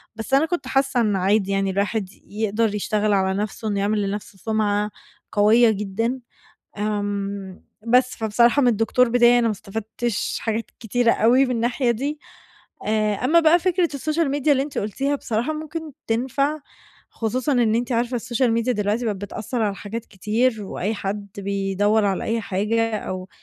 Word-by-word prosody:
بس 225 +3 -6
أنا 275 +3 +5
كنت 350 +2 -3
حاسَّة 270 -2 +1
إنُّه 205 -4 +1
عادي 200 +1 +2
يعني 195 0 +1
الواحد 200 +1 -1 0.2
يقدر 215 +1 -1
يشتغل 210 0 0
على 190 -1 +2
نفسه 215 +1 -3
إنُّه 200 -1 0
يعمل 210 +1 +1
لنفسه 200 -1 -6
سمعة 210 +1 0 0.4
قويَّة 220 +3 +5
جدًا. 215 +5 -2 0.6
آمم، 200 -2 -3 0.2
بس 250 +2 +3
فبصراحة 235 +5 +3
من 245 - +4
الدكتور 230 +3 +2
بتاعي 240 0 +5
أنا 235 - +2
ما - - +1
استفدتش 220 +2 -3
حاجات 225 0 -2
كتيرة 235 +1 +2
أوي 245 +5 +4
من - - -4
الناحية 240 +1 +1
دي. 280 +6 -2 0.7
آآ، 215 -1 +1
أمَّا 280 +11 +3
بقى 325 +1 +5
فكرة 360 -1 +1
السوشيال 310 +1 0
ميديا 290 +1 +2
اللي 270 -1 +2
أنتِ 285 - -6
قلتيها 270 +8 -1
بصراحة 235 +4 -2
ممكن 310 0 -6
تنفع، 265 +6 0 0.5
خصوصًا 250 +5 -1
إن 235 -4 +3
أنتِ 245 +1 -1
عارفة 240 +1 0
السوشيال 240 +1 0
ميديا 230 +2 +1
دلوقتي 210 +2 -1
بقت 210 -3 -1
بتأثَّر 220 +4 -4
على 205 -2 0
حاجات 220 +3 -6
كتير، 215 +3 0
وأي 195 +2 -3
حد 200 0 -4
بيدوَّر 200 +2 +1
على 195 -1 0
أي 225 +1 0
حاجة، 215 +3 0
أو 185 -1 -6
225 Hz, 165 wpm, -22 LUFS, 205-250 Hz, 0.7 s, أنا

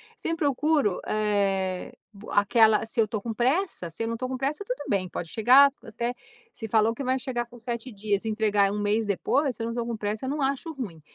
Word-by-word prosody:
sempre 330 -7 -2
procuro, 285 - +1
eh, 195 -3 0 0.2
b 205 +2 -13
aquela 220 +1 +4
se 225 - -6
eu 215 - +2
tô 210 0 -3
com 230 +1 -4
pressa. 255 - 0
Se 165 - -4
eu - - -1
não 230 0 -2
tô 255 +2 -3
com 260 0 -3
pressa, 280 +8 -2
tudo - - -4
bem, 195 -3 +1
pode 170 - -5
chegar 260 - +6
até 235 +2 -3 0.4
se 225 - -6
falou 220 +1 +3
que 275 - -6
vai 260 0 +1
chegar 245 -2 -3
com 240 - -14
7 235 +2 -5
dias, 205 0 -2
e - - -1
entregar 210 -2 +2
1 210 - -3
mês 210 +2 +1
depois, 255 +7 0
se 230 - -5
eu - - -2
não 230 - -3
tô 235 -1 -2
com 235 -1 -3
pressa, 210 +3 -3
eu - - -2
não 295 +2 -2
acho 275 +4 -1
ruim. 205 - -7
225 Hz, 235 wpm, -26 LUFS, 210-260 Hz, 0.4 s, chegar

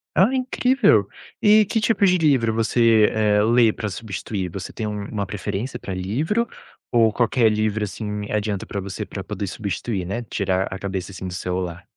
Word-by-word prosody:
Ah 195 +8 +4
incrível, 260 0 +3 0.3
e 215 0 +6
que 225 - 0
tipos 210 -3 +3
de 180 - +3
livro 135 -9 +3
você, 115 -1 +4
eh, 105 -1 +3
lê 115 0 +4
pra 105 0 -4
substituir? 100 -2 -4
Você 95 +2 -7
tem 110 - -3
uma 105 0 -3
preferência 105 +5 -4
pra 95 - -6
livro? 145 - -1 0.4
Ou 115 -2 +4
qualquer 120 -1 +3
livro, 105 0 0
assim, 105 0 -4
adianta 105 -2 -1
pra 100 - -4
você 95 0 -5
pra - - -7
poder 100 - -4
substituir, 100 0 -3
né, 100 +7 -3
tirar 95 -4 -1
a 95 - -6
cabeça, 95 -1 -4
assim, 95 0 -6
do 90 - -6
celular? 90 -1 -3
105 Hz, 175 wpm, -22 LUFS, 100-120 Hz, 0.4 s, e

